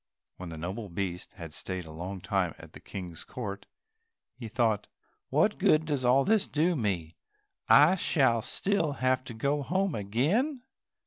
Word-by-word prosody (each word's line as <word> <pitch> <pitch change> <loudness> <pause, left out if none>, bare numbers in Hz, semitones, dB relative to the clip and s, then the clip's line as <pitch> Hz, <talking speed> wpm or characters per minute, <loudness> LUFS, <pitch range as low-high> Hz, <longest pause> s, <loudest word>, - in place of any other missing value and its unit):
When 90 -2 -7
the 80 - -7
noble 95 +6 -5
beast 90 0 -4
had 85 -5 -9
stayed 90 +2 -5
a 80 - -10
long 90 +4 -6
time 95 -5 0
at - - -13
the - - -10
King's 90 -4 -7
court, 100 -5 -6 0.7
he 120 -3 -8
thought, 110 -2 +1 0.4
"What - - +2
good 155 +1 +4
does 145 -4 -1
all 130 +2 +4
this 215 -1 +3
do 165 +4 +1
me, 90 - -2 0.5
I 150 +5 +8
shall 135 -10 +2
still 170 - 0
have 130 -1 +1
to 115 - -8
go 140 +5 0
home 185 +5 0
again?" 160 - 0
115 Hz, 165 wpm, -29 LUFS, 95-150 Hz, 0.7 s, I